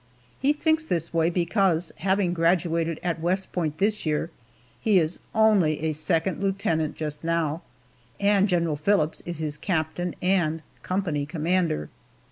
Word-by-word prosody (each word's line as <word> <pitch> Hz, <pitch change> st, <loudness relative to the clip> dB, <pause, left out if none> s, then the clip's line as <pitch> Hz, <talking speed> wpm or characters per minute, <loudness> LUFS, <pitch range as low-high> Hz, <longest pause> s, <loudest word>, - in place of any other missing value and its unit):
He 275 Hz, +2 st, +3 dB
thinks 315 Hz, +1 st, +1 dB
this 170 Hz, -, -1 dB
way 165 Hz, 0 st, +3 dB
because, 175 Hz, -1 st, +1 dB
having 190 Hz, 0 st, +1 dB
graduated 165 Hz, -1 st, +1 dB
at 175 Hz, -2 st, -1 dB
West 185 Hz, +3 st, 0 dB
Point 160 Hz, -4 st, -2 dB
this 210 Hz, +3 st, 0 dB
year, 155 Hz, +2 st, -1 dB, 0.5 s
he 210 Hz, -3 st, +3 dB
is 165 Hz, -1 st, +1 dB, 0.2 s
only 205 Hz, -9 st, +4 dB
a 160 Hz, 0 st, 0 dB
second 165 Hz, +4 st, 0 dB
lieutenant 190 Hz, -6 st, 0 dB
just 150 Hz, -1 st, -4 dB
now, 165 Hz, -1 st, 0 dB, 0.6 s
and 200 Hz, 0 st, +3 dB
General 170 Hz, -4 st, +1 dB
Phillips 160 Hz, -1 st, +1 dB
is 175 Hz, -2 st, -4 dB
his 155 Hz, -2 st, -3 dB
captain 165 Hz, +1 st, -2 dB
and 170 Hz, -4 st, +1 dB, 0.2 s
company 170 Hz, -7 st, -1 dB
commander. 165 Hz, -, -1 dB
170 Hz, 140 wpm, -25 LUFS, 160-190 Hz, 0.6 s, only